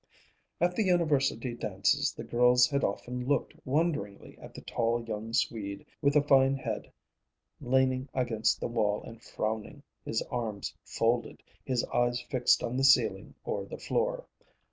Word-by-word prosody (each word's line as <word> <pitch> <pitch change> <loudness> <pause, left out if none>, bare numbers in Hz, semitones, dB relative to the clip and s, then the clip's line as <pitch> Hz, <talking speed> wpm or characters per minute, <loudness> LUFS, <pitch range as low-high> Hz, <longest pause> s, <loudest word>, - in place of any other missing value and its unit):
At 175 +1 +2
the - - +1
University 145 - +1
dances 105 +6 +1
the - - -8
girls 125 +1 +4
had 140 +2 -1
often 125 0 -2
looked 140 -3 0
wonderingly 135 -9 -1
at - - -12
the - - -8
tall 115 0 -1
young 110 0 -5
Swede 100 -4 -2 0.2
with 140 +1 +2
the 150 - +5
fine 135 -1 +4
head, 135 - -5 0.7
leaning 130 +1 +1
against 115 -4 0
the - - -2
wall 105 -3 0
and 115 0 -11
frowning, 110 +8 -4 0.2
his 110 - -1
arms 110 -5 -3
folded, 115 +1 -1 0.2
his 125 -2 0
eyes 120 0 +2
fixed 125 0 +2
on 120 +2 -2
the 135 - +1
ceiling 110 -8 +3
or - - -3
the - - -7
floor. - - -1
125 Hz, 150 wpm, -30 LUFS, 115-135 Hz, 0.7 s, the